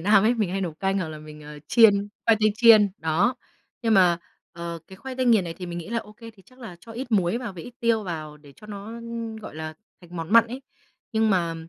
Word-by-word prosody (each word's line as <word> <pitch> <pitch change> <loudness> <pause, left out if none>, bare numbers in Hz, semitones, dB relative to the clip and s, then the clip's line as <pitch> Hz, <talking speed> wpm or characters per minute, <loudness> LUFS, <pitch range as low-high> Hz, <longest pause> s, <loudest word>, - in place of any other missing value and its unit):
Nam 200 +3 +5
ấy, 235 - +4
mình 215 -6 -1
hay 195 +1 -2
nấu 175 -4 -2
canh 195 +3 -1
hoặc 165 - -2
là 155 -1 -7
mình, 150 0 -12
ờ, 150 0 -10
chiên, 205 -3 +5 0.2
khoai 225 - +6
tây 215 -1 +3
chiên, 220 -3 +7
đó. 160 +10 +1 0.5
Nhưng 225 -1 +3
mà, 180 -3 +5 0.3
ờ, 170 0 -6
cái 190 - -13
khoai 260 +5 -7
tây 255 -1 0
nghiền 220 -6 +5
này 165 - -5
thì 180 +1 -7
mình 175 0 -5
nghĩ 165 - -8
là 230 +1 -1
"Ô 210 -2 -10
kê 230 +1 -12
thì 200 -3 -21
chắc 255 0 -21
là 190 -8 -9
cho 225 - -12
ít 245 0 -6
muối 190 +2 +2
vào 240 -5 -6
với 170 -3 -9
ít 245 - -10
tiêu 230 -2 +2
vào 155 -5 -6
để 145 -1 -17
cho 210 - -14
nó, 200 -1 -8
ưm, 230 0 -6
gọi 215 -5 -9
là, 155 0 -6 0.3
thành 175 -1 -12
món 165 +3 -5
mặn 230 0 +7
ấy," 255 +4 -7 0.5
nhưng 220 -1 +2
mà, 170 -4 +1
200 Hz, 265 wpm, -25 LUFS, 170-230 Hz, 0.5 s, chiên